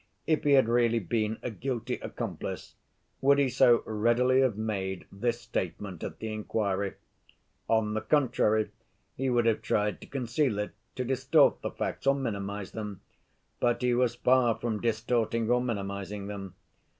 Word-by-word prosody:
If 155 -1 +1
he 145 - +5
had 135 -4 +6
really 115 0 +3
been 110 +2 -1
a 125 - -2
guilty 120 +2 -3
accomplice, - - -5 0.5
would 140 +1 +5
he 140 -2 +3
so 125 -2 +5
readily 120 +4 +3
have 125 -6 +2
made 95 -4 -3
this 115 +4 -1
statement 95 -4 -4
at - - -5
the 110 -1 -4
inquiry? 100 -2 -1 0.7
On 110 -1 +2
the 110 - -1
contrary, 110 -7 +2 0.4
he 135 0 -1
would 120 -2 +2
have 115 -2 +2
tried 105 0 0
to - - -11
conceal 125 -2 0
it, 105 0 -2 0.2
to 125 - -2
distort 135 +4 +3
the - - -2
facts - - -4
or 135 - +5
minimize 100 -6 -4
them. 105 -3 -6 0.6
But 120 +1 +1
he 125 -1 +3
was 120 -1 +2
far 125 -2 +3
from 110 -3 -3
distorting 115 0 0
or 125 0 +3
minimizing 100 -3 -4
them. 100 -2 -7
115 Hz, 160 wpm, -29 LUFS, 105-125 Hz, 0.7 s, had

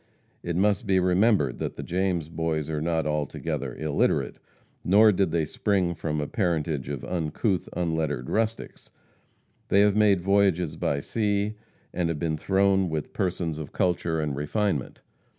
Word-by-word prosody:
It 85 - -3
must 100 +3 +1
be 95 -1 +3
remembered 95 +4 +2
that - - -3
the - - -6
James 90 -3 -1
Boys 80 -2 -2
are 75 -1 -2
not 80 -1 0
altogether 75 -2 -3
illiterate, 75 -1 0 0.4
nor 105 +4 +6
did 95 -2 +1
they 80 -1 0
spring 95 +1 0
from 75 -2 -3
a 75 - -1
parentage 80 - -1
of 70 -3 -4
uncouth, 90 +3 -1
unlettered 80 -7 -1
rustics. 115 0 -2 0.8
They 100 - +4
have 105 -1 +4
made 105 -3 +4
voyages 95 -4 +2
by 70 0 -1
sea, 105 +2 -1 0.4
and 85 -1 0
have 85 - -2
been 80 0 -1
thrown 95 +2 +2
with 80 -2 -4
persons 85 -5 -2
of 75 - -7
culture 85 -2 0
and 75 -3 -2
refinement. 75 - -2
85 Hz, 150 wpm, -26 LUFS, 80-100 Hz, 0.8 s, nor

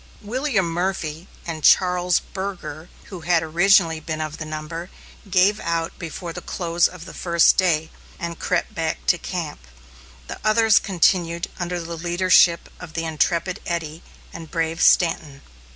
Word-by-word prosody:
William 230 - 0
Murphy 170 -1 -3 0.2
and 160 -2 -5
Charles 180 -1 +4
Burger, 185 -4 -6 0.2
who 185 - -6
had 165 0 +2
originally 170 0 +3
been 155 0 -5
of 155 0 -5
the 155 - -5
number, 155 +3 -6 0.4
gave 195 +3 +3
out 165 -1 -2
before 170 0 -6
the - - -7
close 170 -1 +1
of 180 -2 -11
the - - -10
first 170 -2 +3
day, 160 -4 +1 0.3
and 170 -1 -5
crept 180 - -1
back 160 -1 -3
to 175 - +3
camp. 160 - -5 0.6
The - - -7
others 220 0 +5
continued 175 -3 +1
under 175 0 -2
the 170 0 -6
leadership 175 0 +3
of 175 -3 -10
the 165 0 -3
intrepid 170 +3 0
Eddy 165 -2 -3 0.3
and 165 -2 -9
brave 165 +1 -2
Stanton. 155 -5 +2
170 Hz, 150 wpm, -22 LUFS, 160-180 Hz, 0.6 s, others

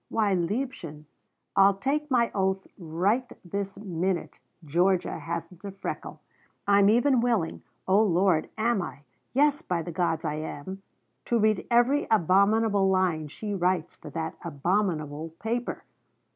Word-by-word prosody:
Why, 210 -3 +1
liebchen, 180 - -3 0.5
I'll 195 0 +6
take 290 +8 -1
my 240 -3 +2
oath 190 -1 0
right 195 +9 -1
this 195 +2 -4
minute 185 -2 -2 0.3
Georgia 175 +4 +1
hasn't 170 +2 -6
a 200 - -5
freckle! 195 0 -6 0.5
I'm 200 0 +5
even 245 +3 +4
willing 230 -9 0 0.3
(oh 195 +3 +5
Lord, 185 -4 +2
am 225 -1 +1
I? 145 - -7 0.3
Yes, 290 +3 +3
by 175 - -2
the 175 - -6
gods 170 -2 -1
I 150 -1 -1
am) 160 +5 -6 0.4
to 235 - +1
read 215 -2 +2
every 245 +5 +3
abominable 200 +1 +3
line 180 -5 +1
she 205 +8 -5
writes 180 -3 0
for - - -11
that 160 -1 -4
abominable 160 -2 -1
paper. 240 +2 -3
195 Hz, 135 wpm, -27 LUFS, 170-220 Hz, 0.5 s, I'll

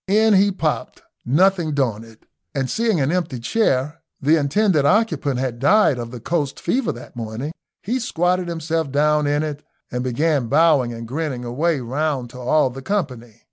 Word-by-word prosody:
In 215 +2 +4
he 200 +1 +4
popped, 160 -5 -3 0.2
nothing 170 +2 +2
daunted, 115 -4 -3 0.3
and 135 -2 0
seeing 225 -6 +1
an 140 +2 +1
empty 170 -8 -2
chair 140 - 0 0.2
the 150 +3 +3
intended 160 +2 +2
occupant 145 - +1
had 125 -3 -3
died 145 - +4
of 120 -1 -5
the 125 0 -8
coast 145 +2 -2
fever 250 -8 0
that 120 - -12
morning 115 +5 -5 0.3
he 245 +6 -1
squatted 180 -5 0
himself 165 -3 -2
down 150 +1 +2
in 145 +1 +1
it, 150 -1 -5 0.3
and 125 +1 -2
began 140 +1 0
bowing 145 -3 +3
and 115 0 -7
grinning 135 -2 -3
away 145 +5 0
round 130 0 -2
to 125 - -10
all 130 +2 +2
the 135 +2 -8
company. 130 - -3
145 Hz, 170 wpm, -21 LUFS, 125-170 Hz, 0.3 s, In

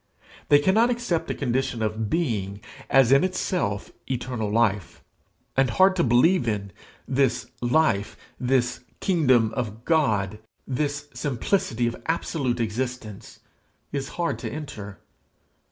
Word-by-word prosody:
They 145 - +8
cannot 200 +11 +3
accept 235 -9 -1
a - - -1
condition 125 -3 -1
of 110 0 -2
being 105 - -1 0.3
as 135 -2 +5
in 135 0 +6
itself 180 - -1 0.2
eternal 125 -4 -2
life. 105 -4 0 0.5
And 135 -1 +3
hard 185 +11 +4
to 170 - +3
believe 125 +5 +4
in, 100 -3 -2 0.4
this 135 -1 +1 0.2
life, 120 -5 +1 0.2
this 125 -1 +1 0.2
kingdom 130 - +3
of 115 -2 -4
God, 110 - +1 0.3
this 145 +2 -2
simplicity 125 - 0
of 120 - -3
absolute 140 -6 -1
existence, 115 -1 -4 0.5
is 140 -1 -3
hard 170 -1 -1
to - - -5
enter. 105 -10 -7
125 Hz, 120 wpm, -25 LUFS, 110-150 Hz, 0.5 s, They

